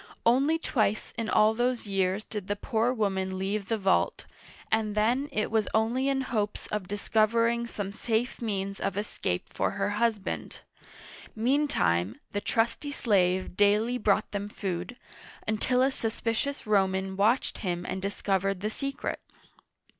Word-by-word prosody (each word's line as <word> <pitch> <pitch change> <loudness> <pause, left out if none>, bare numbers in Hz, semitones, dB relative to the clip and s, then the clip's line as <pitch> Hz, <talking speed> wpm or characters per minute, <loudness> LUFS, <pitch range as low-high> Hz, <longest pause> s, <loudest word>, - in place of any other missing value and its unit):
Only 270 +7 +4
twice 215 -9 0
in 230 -1 -2
all 215 +1 +5
those 240 +1 0
years 195 0 0
did 210 -4 -6
the 205 - 0
poor 225 +3 0
woman 190 -5 -1
leave 195 +1 -2
the 225 - 0
vault, 195 -2 +1 0.5
and 220 -1 +1
then 245 +7 +2
it 215 - -1
was 220 -2 +2
only 240 +5 +2
in 270 -1 +1
hopes 215 -5 -2
of 210 -4 -2
discover 215 +3 +2
ing 235 0 0
some 205 -4 -4
safe 225 +4 -1
means 200 -3 -2
of 195 0 -2
escape 205 - -3
for - - +1
her 200 0 -1
husband. 220 -4 -1 0.7
Mean 270 +7 +2
time, 90 - +1
the 205 - -2
trusty 230 +8 0
slave 185 -9 +1
daily 210 +5 +3
brought 210 0 +2
them 205 0 -3
food, 190 +3 -4 0.5
until 250 +4 +2
a 270 - +3
suspicious 230 +3 -2
Roman 190 -2 +1
watched 220 +6 +2
him 175 -3 -2
and 190 - -3
discovered 195 -1 0
the 215 +1 -1
secret. 275 +3 -3
215 Hz, 150 wpm, -28 LUFS, 195-235 Hz, 0.7 s, all